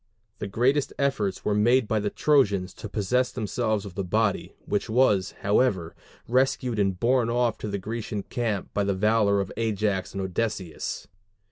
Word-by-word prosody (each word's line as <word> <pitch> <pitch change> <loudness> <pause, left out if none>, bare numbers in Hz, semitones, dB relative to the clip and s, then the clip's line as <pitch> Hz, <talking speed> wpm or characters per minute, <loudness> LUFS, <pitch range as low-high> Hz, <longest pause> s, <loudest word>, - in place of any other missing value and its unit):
The 105 - -3
greatest 130 +8 +1
efforts 130 -9 -1
were 105 - +2
made 115 +3 +3
by 110 0 +1
the 105 0 -1
Trojans 100 -12 +2
to 110 - -8
possess 125 +5 0
themselves 110 -2 -1
of 100 - -8
the 100 - -3
body, 105 +2 0
which 105 +2 -1
was, 110 -5 +2
however, 100 -5 +1 0.3
rescued 125 -2 +1
and 95 -3 +1
borne 120 +1 +2
off 120 -2 +1
to - - -4
the 100 -1 -2
Grecian 105 +1 -4
camp 110 -5 -3
by 100 - +1
the 100 -1 0
valor 105 0 +3
of 95 -1 -3
Ajax 105 -4 -1
and 100 - -2
Odysseus. 95 -2 -3
105 Hz, 165 wpm, -26 LUFS, 100-120 Hz, 0.3 s, made